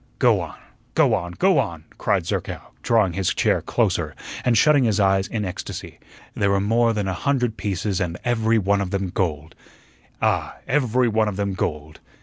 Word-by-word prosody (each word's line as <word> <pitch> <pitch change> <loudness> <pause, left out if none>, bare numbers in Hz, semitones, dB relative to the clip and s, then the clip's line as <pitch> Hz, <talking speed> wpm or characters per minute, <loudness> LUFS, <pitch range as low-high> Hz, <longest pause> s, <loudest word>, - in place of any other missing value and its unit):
"Go - - +4
on, - - -7 0.4
go - - +4
on, 85 0 -2
go 190 - +3
on," 85 -2 -3 0.2
cried - - +1
Zerkow, - - -4
drawing 110 -6 +2
his 95 0 0
chair - - +2
closer, - - 0 0.3
and 120 -2 +3
shutting 145 +3 +5
his 110 -2 +1
eyes 95 -1 +3
in 105 -2 -3
ecstasy. 90 - -7 0.3
"There 100 - +1
were 100 0 +2
more 115 +4 +2
than 105 -3 -2
a 95 - -1
hundred 125 +2 0
pieces, 100 -2 -2
and 85 -1 -2
every 115 -2 +2
one 100 -1 +2
of 95 - -2
them 100 -1 -2
gold 80 -4 -2 0.4
" - - -33
"Ah, - - 0
every 125 -3 +2
one 110 -1 +2
of 105 - -2
them 100 0 -1
gold." 75 -4 -4
100 Hz, 185 wpm, -23 LUFS, 95-115 Hz, 0.4 s, shutting